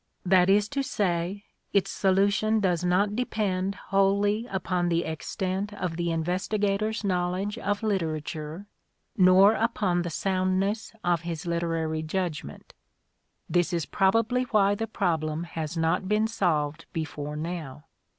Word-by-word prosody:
That 185 0 +5
is 205 +1 +4
to 280 -1 -1
say, 195 -5 -1 0.3
its 200 - +2
solution 200 +3 +2
does 180 -4 +1
not 195 +4 +2
depend 200 -5 -1
wholly 200 +4 +1
upon 180 -2 -1
the 170 0 +1
extent 185 +5 -3
of 180 -5 -3
the 170 0 -1
investigator's 200 +6 -1
knowledge 185 +2 -1
of 205 +1 -2
literature 160 -3 -3 0.5
nor 190 +2 +6
upon 210 -6 +1
the 175 - -3
soundness 190 +4 0
of 175 -2 +1
his 170 0 -5
literary 165 -2 -1
judgment. 160 -1 -4 0.7
This 175 0 +1
is 170 -4 -1
probably 225 - +2
why 205 -4 +3
the 225 +2 -3
problem 160 -5 -1
has 165 -1 -5
not 165 +4 +1
been 210 +2 +2
solved 160 -7 -1
before 150 -2 -4
now. 155 -3 -5
185 Hz, 130 wpm, -27 LUFS, 170-205 Hz, 0.7 s, nor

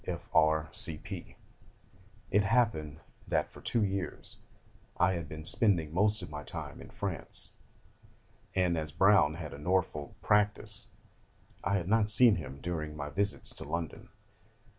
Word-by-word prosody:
F.R.C.P. 80 0 0 1.0
It 105 - +4
happened 100 -9 +1 0.3
that - - 0
for - - -13
two 115 - 0
years 95 -4 -4 0.6
I 90 +1 +3
had 85 -4 -5
been 80 0 -8
spending 85 -4 +2
most 105 +2 +2
of - - -7
my 75 -1 -5
time 75 - -7
in - - -11
France, 95 -7 -2 1.0
and 90 -3 +2
as 75 -1 -4
Browne 80 -2 +4
had 80 -3 -7
a 70 - -9
Norfolk 80 -3 -1
practice, 105 0 +2 0.8
I 100 - +1
had 90 -3 -1
not 110 0 +3
seen 110 0 +8
him 70 -5 -7
during 75 -3 -4
my 70 0 -5
visits 100 +6 -1
to - - -9
London. 85 -3 -5
85 Hz, 140 wpm, -31 LUFS, 75-100 Hz, 1.0 s, seen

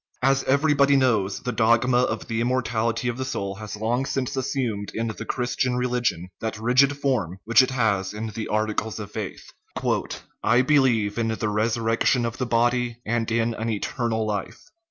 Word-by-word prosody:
As 135 +1 +3
everybody 140 0 +3
knows, 110 -8 +1
the 125 - -2
dogma 120 +2 +3
of 115 -3 -1
the 115 0 -1
immortality 115 -1 0
of 120 +1 -2
the - - -1
soul 100 -7 -3
has 110 0 -7
long 120 +5 -1
since 135 0 -2
assumed 120 -6 -2
in 115 - -1
the 110 -2 -5
Christian 125 0 -1
religion 120 -8 -1
that 110 -1 -3
rigid 130 +5 +3
form 115 -11 -1
which 115 +2 +6
it 130 - +1
has 110 -7 0
in 105 +1 -5
the 110 +1 -5
articles 110 +1 -1
of 105 -1 -7
faith: 105 -3 -6
" - - -9 0.6
I 120 +3 +4
believe 120 -7 +2
in 115 - +1
the 110 -1 -1
resurrection 115 +3 +1
of 115 0 -4
the 125 - -1
body 120 0 +1
and 115 0 -1
in 115 0 +1
an 110 +1 -3
eternal 110 +1 -1
life." 105 -2 -4
115 Hz, 175 wpm, -24 LUFS, 110-125 Hz, 0.6 s, which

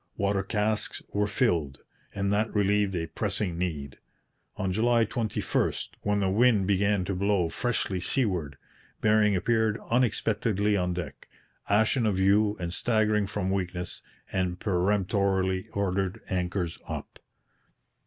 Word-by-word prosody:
Water 100 0 +1
casks 105 +2 -1
were 105 0 +1
filled; 85 - 0 0.4
and 100 0 0
that 110 +2 +1
relieved 100 -1 +2
a 85 -1 -1
pressing 90 +2 -2
need. 75 -7 -4 0.6
On 95 -1 -1
July 115 +3 +3
21, 115 -1 -1 0.3
when 105 0 0
the 95 - +1
wind 110 -1 +4
began 100 0 +2
to 100 - -2
blow 95 -2 +1
freshly 105 -3 -1
seaward, 90 - -1 0.4
Bering 105 -1 +3
appeared 110 +2 +1
unexpectedly 105 -3 +1
on 90 -2 0
deck, 80 -6 -7 0.4
ashen 110 +3 +3
of 100 -3 +1
hue 105 +2 +3
and 85 -1 -3
staggering 110 -1 +1
from 95 -2 -2
weakness, 90 -2 -3 0.3
and 90 -1 -1
peremptorily 95 -1 +1
ordered 95 -1 -1
anchors 90 -1 -2
up. - - -7
100 Hz, 125 wpm, -27 LUFS, 90-105 Hz, 0.6 s, wind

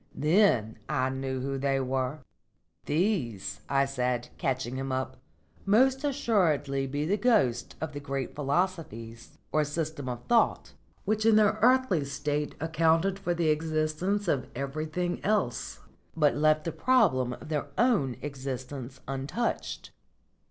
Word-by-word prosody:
Then 150 - +3
I 130 - +1
knew 130 -1 -3
who 135 +1 -2
they 135 0 +1
were." 130 +2 -2 0.7
"These," 125 - -1
I 140 0 +3
said, 125 -3 -1
catching 130 -1 -1
him 135 0 -3
up, 130 0 -2 0.5
"must 260 +7 +3
assuredly 165 - +1
be 145 +3 -2
the 200 +6 +1
ghosts 200 - +2
of 160 -2 -4
the 145 - -5
great 135 -2 -4
philosophies, 140 - -3
or 155 - +3
systems 150 -2 -3
of 120 -1 -5
thought, 235 -1 +2 0.3
which 215 0 +1
in 225 -1 +5
their 215 0 +4
earthly 250 - +4
state 145 +2 -2
accounted 165 +4 +2
for 175 -3 -1
the 165 -2 +1
existence 155 +6 0
of 135 -6 0
everything 155 +6 -3
else, 125 - -1 0.4
but 150 -2 +4
left 155 +1 +3
the 165 - -2
problem 160 - +2
of 150 - -10
their 150 -2 -1
own 210 - +2
existence 130 -2 -6
untouched." 135 - -3
150 Hz, 135 wpm, -28 LUFS, 130-185 Hz, 0.7 s, in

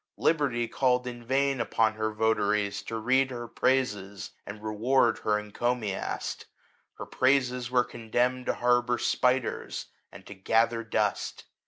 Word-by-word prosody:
Liberty 135 -7 +1
called 125 -1 +1
in 120 -1 -7
vain 135 +1 +1
upon 110 -1 +1
her 110 0 -2
votaries 105 -2 +1
to 115 - -5
read 130 +4 +2
her 120 -2 -6
praises, 105 -6 -1 0.2
and 105 +1 -8
reward 115 +3 +2
her 105 -1 +1
encomiast: 105 -1 -3 0.5
her - - -8
praises 125 -2 +1
were 125 -1 +3
condemned 125 +1 -1
to - - +1
harbour 120 0 +2
spiders, 125 +1 0 0.2
and 95 +2 -13
to - - -9
gather 115 +4 +1
dust. 110 -2 -1
120 Hz, 135 wpm, -28 LUFS, 110-125 Hz, 0.5 s, were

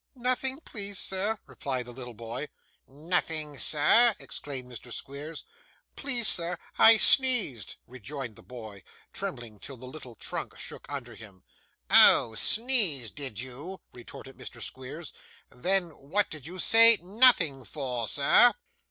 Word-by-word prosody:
'Nothing, 255 +2 -1
please 200 - -6
sir,' 200 +5 -1
replied 130 -3 -5
the 120 - -11
little 125 -1 -10
boy. 115 +6 -7 0.4
'Nothing, 155 0 -4
sir!' 210 +10 +4
exclaimed 130 -3 -6
Mr. 125 0 -11
Squeers. 140 +6 -6 0.5
'Please 245 -5 -1
sir, 170 +1 +2 0.2
I 225 0 +8
sneezed,' 225 - +3
rejoined 130 -1 -9
the - - -16
boy, 110 -6 -11 0.3
trembling 110 -4 -7
till 135 +4 -10
the 125 - -12
little 130 -3 -11
trunk - - -7
shook - - -10
under 125 -4 -7
him. 100 -5 -15 0.5
'Oh! 115 - +7
sneezed, 200 - +2
did 135 -8 -7
you?' 140 +9 -9
retorted 125 +2 -13
Mr. - - -11
Squeers. 135 +5 -8 0.4
'Then 180 +7 -1
what 165 +7 -3
did 150 -2 -9
you 180 +2 -9
say 230 +3 +5
"nothing" 185 - +3
for, 125 -3 -5
sir? 145 - +4
145 Hz, 135 wpm, -27 LUFS, 125-195 Hz, 0.5 s, I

